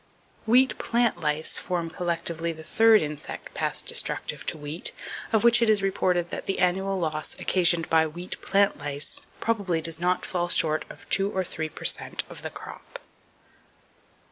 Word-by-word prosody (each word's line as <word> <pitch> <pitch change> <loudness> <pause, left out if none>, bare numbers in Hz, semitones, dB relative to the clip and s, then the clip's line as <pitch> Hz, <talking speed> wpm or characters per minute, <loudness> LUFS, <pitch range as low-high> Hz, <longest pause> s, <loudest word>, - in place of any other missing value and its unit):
Wheat 255 +3 +4
plant 235 -5 +1
lice 155 -1 0
form 170 -3 -3
collectively 170 -1 -2
the 160 -1 -10
third 225 +4 +5
insect 150 -1 -7
pest - - -1
destructive - - -1
to - - +1
wheat, 150 +3 -3 0.4
of 220 -1 +2
which 235 0 +7
it 230 - +3
is 210 -2 +3
reported 180 -2 0
that - - -6
"the 195 - -1
annual 190 +2 +1
loss 155 -2 -3
occasioned 170 -3 +3
by 160 -1 +3
wheat 175 +4 -8
plant 200 -4 +2
lice 145 0 -2 0.2
probably 200 -7 0
does 160 0 -2
not 180 +1 0
fall 175 -1 -2
short 155 -2 +1
of - - -13
two 195 +1 +1
or 190 -2 -1
three 160 -3 -4
per - - -10
cent - - +2
of - - -9
the - - -4
crop." - - -10
175 Hz, 170 wpm, -26 LUFS, 160-195 Hz, 0.4 s, which